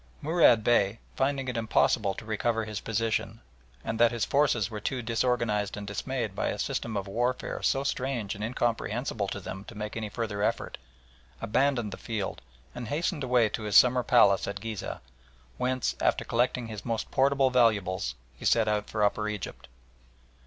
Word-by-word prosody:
Murad 150 -8 +5
Bey, 110 -2 +3 0.2
finding 135 0 0
it 125 - -3
impossible 110 -2 +2
to 110 - -9
recover 110 +1 0
his 105 -2 -4
position, 115 +1 -1 0.4
and 115 - -3
that 120 0 +6
his 120 -2 -1
forces 130 -8 +2
were 105 - -4
too 125 +3 -3
disorganised 115 -3 0
and 105 - -5
dismayed 110 +1 -3
by - - -1
a - - -2
system 110 -2 -2
of 100 0 -3
warfare 120 +5 -1
so 135 - +1
strange 125 -6 -2
and 105 - -6
incomprehensible 115 -1 -1
to 100 - -4
them 95 0 -7
to 110 - -11
make 105 0 -5
any 110 -2 -3
further 105 -2 -3
effort, - - -1 0.6
abandoned 120 -1 +1
the - - -7
field 110 -4 -4 0.3
and 120 - -6
hastened 150 - -1
away 125 -3 +3
to 105 - -4
his 105 -2 +3
summer 125 0 +6
palace 100 -6 +4
at 100 0 -4
Ghizeh, 110 -1 -5 0.6
whence, 130 0 0
after - - +1
collecting 120 +1 0
his 110 -2 -7
most 115 -2 -3
portable 135 0 +3
valuables, 100 - +2 0.2
he - - -13
set 115 -2 +3
out 105 -1 0
for 105 -1 0
Upper 105 +1 +1
Egypt. 105 -3 -6
115 Hz, 175 wpm, -28 LUFS, 105-125 Hz, 0.6 s, that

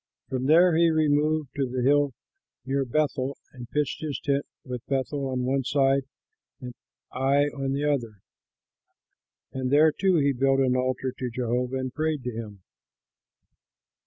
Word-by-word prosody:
From 130 0 -2
there 170 +2 +6
he 170 +1 +4
removed 155 -1 +1
to 135 -3 -1
the 125 0 -2
hill 145 0 +3 0.5
near 135 +1 0
Bethel 140 0 -1 0.2
and 120 -3 -10
pitched 150 -1 -1
his 150 -3 -3
tent 140 0 -1 0.2
with 125 -3 -6
Bethel 135 +1 -1
on 130 -1 -2
one 135 +2 0
side 135 0 +2 0.5
and 125 -3 -8 0.4
Ai 135 +2 +2
on 135 -1 -2
the 140 +1 -2
other, 120 -8 -1 1.3
and 130 -1 -2
there 155 +2 +6
too 190 +4 +1
he 140 -3 +3
built 135 +1 +2
an 130 -1 +2
altar 130 0 -1
to 125 - -2
Jehovah 125 +2 -2
and 130 -1 -4
prayed 155 -3 -1
to 125 - -3
him. 105 -4 -8
135 Hz, 155 wpm, -26 LUFS, 125-145 Hz, 1.3 s, there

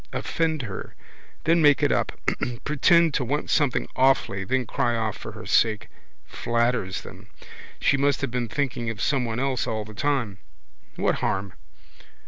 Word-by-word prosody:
Offend 160 -4 -1
her. 100 -4 -7 0.5
Then 165 +1 +3
make 145 -2 +5
it - - +3
up. - - 0 0.5
Pretend 165 +2 +4
to 135 - +1
want 145 +5 -2
something 145 -5 +2
awfully, 130 -7 +2
then 130 +5 0
cry 120 0 0
off 110 -2 -1
for - - -8
her - - -9
sake. 110 -2 +2 0.4
Flatters 115 -5 -1
them. - - -12 0.5
She 140 - +3
must 140 +1 +1
have 135 - -2
been 120 -2 -2
thinking 125 -4 -2
of 115 -1 -5
someone 120 -4 0
else 135 -2 0
all 110 -1 -2
the 110 - -11
time. 120 -5 -1 0.6
What - - 0
harm? 95 0 -1
125 Hz, 155 wpm, -25 LUFS, 110-145 Hz, 0.6 s, make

